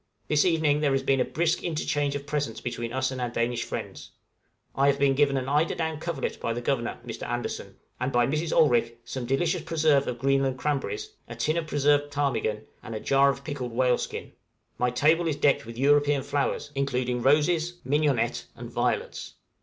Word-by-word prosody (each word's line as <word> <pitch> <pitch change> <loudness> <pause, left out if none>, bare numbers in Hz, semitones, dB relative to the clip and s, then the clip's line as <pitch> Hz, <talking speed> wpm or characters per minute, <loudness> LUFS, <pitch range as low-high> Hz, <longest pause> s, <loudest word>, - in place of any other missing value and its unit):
This 150 -1 +3
evening 160 -4 +2
there 145 -2 +2
has 135 - +1
been 135 -1 +2
a - - +4
brisk 165 +4 0
interchange 145 -3 -1
of 140 0 -5
presents 145 -6 -2
between 120 -1 -4
us 130 +1 0
and 130 -1 -4
our 120 - -1
Danish 115 0 -1
friends. - - -6 0.6
I 135 +1 +2
have 140 -1 +3
been 140 -1 +3
given 140 0 +2
an 130 0 -2
eider 150 +4 +1
down 160 -2 -2
coverlet 160 -4 -3
by 115 - -1
the 120 - -3
Governor, 120 -1 -2
Mr. 115 - -6
Andersen; 120 0 -4 0.2
and, 130 +1 -1
by 120 -1 +3
Mrs. 155 +5 -1
Olrik, 120 -5 +3
some 120 +1 -5
delicious 165 +6 +1
preserve 150 -4 +2
of 120 - -3
Greenland 135 +1 +1
cranberries, 150 - -2 0.2
a - - -8
tin 155 - 0
of 165 -2 -2
preserved 145 0 +2
ptarmigan, 115 -7 -1 0.2
and 115 - -7
a - - -3
jar 140 +4 +4
of 140 0 -3
pickled 135 -6 -5
whale 125 0 +2
skin; - - -5 0.5
my 125 - +2
table 155 +7 +3
is 155 - 0
decked 140 -5 +2
with 115 0 -8
European 145 +1 +3
flowers, 145 +1 -1
including 125 -3 -1
roses, 160 +5 +2
mignonette, 135 -4 +1
and - - -9
violets. - - -2
140 Hz, 195 wpm, -27 LUFS, 125-150 Hz, 0.6 s, a